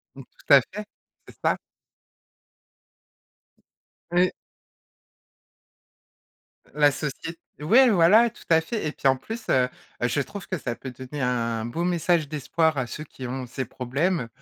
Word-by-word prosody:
Mmh - - -10
tout - - +4
à - - +9
fait, 210 0 -8 0.4
c'est - - -14
ça. - - +2 2.5
Oui. 180 +1 +3 2.4
La 145 0 +4
socié 150 +4 -5 0.2
ouais, 240 - +6
voilà, 210 +6 +6
tout 235 - -17
à 165 -1 +5
fait 165 +3 -4
et 150 - -1
puis - - -5
en 135 - +5
plus, 225 - -8
heu 125 -1 +3 0.3
heu 120 - +3
je 125 +4 0
trouve 200 +7 -6
que 185 - -1
ça 120 -5 -3
peut 130 +2 -8
donner 130 +3 -8
un 115 -3 -1
beau 165 +9 -3
message 170 -3 +1
d'espoir 155 +1 0
à 130 - 0
ceux 150 +5 -7
qui 130 -3 -9
ont 130 0 -4
ces 130 +2 -4
problèmes. 135 +5 -1
150 Hz, 150 wpm, -25 LUFS, 130-175 Hz, 2.5 s, à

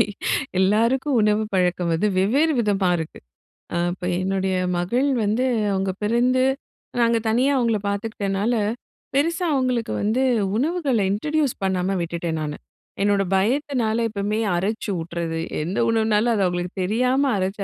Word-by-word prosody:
மாதிரி - - +6 0.6
எல்லாருக்கும் 235 +8 +2
உணவு 210 +1 +2
பழக்கம் 180 -2 +1
வந்து 165 +6 +1
வெவ்வேறு 275 +12 +3
விதமா 200 -4 +1
இருக்கு. 160 -1 -6 0.6
அ - - +1 0.2
இப்ப 180 - -7 0.2
என்னுடைய 190 0 0 0.2
மகள் 240 +11 +1 0.2
வந்து 220 +5 +1 0.3
அவுங்க 190 0 0
பிறந்து 245 +4 +2 0.6
நாங்க 235 -1 +3
தனியா 250 +5 +2
அவுங்கள 235 -3 +2
பார்த்துக்கிட்டனால, 200 +1 -1 0.6
பெருசா 335 +5 +1
அவுங்களுக்கு 255 -4 0
வந்து 220 +5 +1 0.4
உணவுகள 290 -1 0
இன்ட்ரோடியூஸ் 295 +5 0
பண்ணாம 190 0 0
விட்டுட்டேன் 170 -1 -3
நானு. 150 -1 -4 0.4
என்னோட 200 0 +2
பயத்தினால 235 +2 +1
எப்பமே 210 +1 -2 0.2
அரச்சு 205 +5 -2
ஊட்டுறது. 165 0 -4 0.2
எந்த 180 +6 -2
உணவுனாலும் 220 0 +2
அத 210 - 0
அவுங்களுக்கு 175 0 -2
தெரியாம 250 +8 +1
அரைச்சு 190 +2 -2
210 Hz, 130 wpm, -22 LUFS, 190-250 Hz, 0.6 s, மாதிரி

